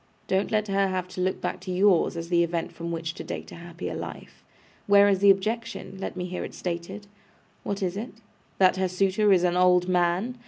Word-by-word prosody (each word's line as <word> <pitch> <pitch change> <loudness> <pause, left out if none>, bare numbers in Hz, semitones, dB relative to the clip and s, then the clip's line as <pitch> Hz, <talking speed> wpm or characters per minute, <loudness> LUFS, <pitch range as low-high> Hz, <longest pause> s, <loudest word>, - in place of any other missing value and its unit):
Don't 190 +1 0
let 215 -1 0
her 195 0 +2
have 185 -1 -2
to 185 0 -5
look 185 +1 0
back - - -3
to 185 - -6
yours, 180 -2 +3
as 165 0 -5
the 170 -1 +3
event 170 -1 -2
from 170 0 -6
which 165 0 -3
to - - -8
date - - -7
a - - -9
happier 170 0 -7
life. - - -8 0.4
Where 200 0 +6
is 195 -2 +2
the 200 0 +5
objection? 215 0 -1
Let 190 - -5
me 180 - -3
hear 180 0 -4
it - - -8
stated. 180 +4 -5 0.6
What 200 0 -3
is 180 0 -1
it? 225 +5 -5 0.4
That 185 -1 +4
her 190 0 +1
suitor 195 +3 +2
is 180 -2 +4
an 175 -1 +2
old 180 0 +4
man? 180 +7 0
185 Hz, 220 wpm, -26 LUFS, 175-200 Hz, 0.6 s, Where